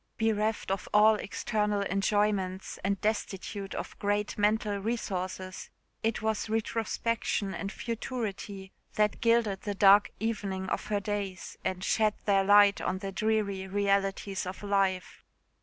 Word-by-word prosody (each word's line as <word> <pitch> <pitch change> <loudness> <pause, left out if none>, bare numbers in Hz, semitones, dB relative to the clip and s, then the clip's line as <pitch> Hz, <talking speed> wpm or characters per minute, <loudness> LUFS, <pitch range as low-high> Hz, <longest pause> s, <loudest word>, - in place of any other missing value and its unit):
Bereft 220 -2 0
of 195 -1 -3
all 215 +1 +7
external 210 0 -1
enjoyments, 195 -1 0
and 200 0 0
destitute 205 -2 -3
of - - -6
great 205 +1 0
mental 210 0 +1
resources, 190 -4 -4 0.3
it 225 0 -1
was 220 0 -1
retrospection 225 -2 -1
and 195 +1 -4
futurity 210 -5 -5 0.2
that 210 -1 +1
gilded 230 -4 +2
the 205 -2 -3
dark 200 +1 +6
evening 200 -4 -2
of - - -2
her 205 -1 0
days, 200 -2 -4
and 185 0 -2
shed 215 0 +2
their 195 -2 +4
light 205 0 +6
on 185 - -1
the 195 0 -5
dreary 200 -2 0
realities 195 -1 0
of 185 +3 -7
life. 195 -2 0
205 Hz, 130 wpm, -29 LUFS, 195-215 Hz, 0.3 s, all